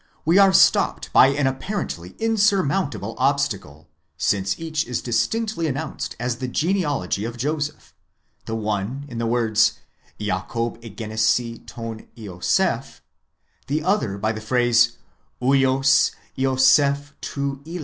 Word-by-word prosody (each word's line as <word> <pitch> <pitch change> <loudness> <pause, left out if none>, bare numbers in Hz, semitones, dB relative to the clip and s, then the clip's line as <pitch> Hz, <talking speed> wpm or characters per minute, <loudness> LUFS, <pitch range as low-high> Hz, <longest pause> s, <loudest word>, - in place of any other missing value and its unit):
we 170 +5 +5
are 195 -1 +7
stopped - - +3
by - - +8
an 140 +1 0
apparently 130 - -3
insurmountable 200 -8 +1
obstacle, 100 - -1 0.3
since 100 - 0
each 160 -2 -2
is 125 -1 -2
distinctly 170 - -1
announced 145 +2 -4
as 120 0 -2
the 130 +1 -4
genealogy 145 - -1
of 115 +2 -5
Joseph; 150 +3 -3 0.5
the 110 - -2
one 110 +5 -3
in 120 -2 -6
the 115 - -1
words 115 -2 +2 0.5
᾿Ιακὼβ 115 +2 -3
ἐγέννησε 110 +2 0
tov 115 -1 -8
Ἰωσὴφ, 95 -6 -1 0.7
the 150 +2 -1
other 180 - 0
by 110 +2 0
the 110 0 -6
phrase 120 0 +3 0.4
vids 135 +1 +3 0.2
Ἰωσὴφ 135 +2 +3
τοῦ 140 0 -4
"HA. 175 +2 -5
130 Hz, 120 wpm, -22 LUFS, 110-145 Hz, 0.7 s, by